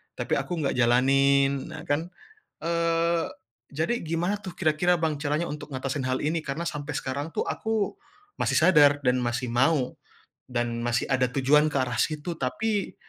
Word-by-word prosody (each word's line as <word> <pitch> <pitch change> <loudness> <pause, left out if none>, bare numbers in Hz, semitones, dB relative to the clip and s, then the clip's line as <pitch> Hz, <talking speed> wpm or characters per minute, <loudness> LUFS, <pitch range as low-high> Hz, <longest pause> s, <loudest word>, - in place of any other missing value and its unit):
tapi - - -1
aku 175 -2 -3
nggak 140 - -1
jalanin, 135 +3 +3
nah, - - -8
kan. 160 +4 0 0.5
Eee, 170 0 +1 0.5
jadi 165 +11 0
gimana, 175 +5 -1
tuh, 185 -4 -8
kira-kira, 175 +1 +2
Bang, 155 -3 0
caranya 150 +3 0
untuk 150 0 -7
ngatasin 130 0 -2
hal 130 0 -1
ini 160 +3 0
karena 140 +4 -3
sampai 150 -4 -5
sekarang, 140 +4 -3
tuh, - - 0
aku 220 -2 -1 0.4
masih - - +1
sadar 150 -4 +5
dan 125 0 +3
masih 120 +1 -2
mau, 130 +2 +2 0.6
dan 120 -1 -2
masih 120 0 0
ada 130 -1 +3
tujuan 145 +3 +4
ke - - +1
arah 125 -2 -2
situ 155 +4 -1
tapi 205 +10 -1
145 Hz, 160 wpm, -26 LUFS, 130-165 Hz, 0.6 s, sadar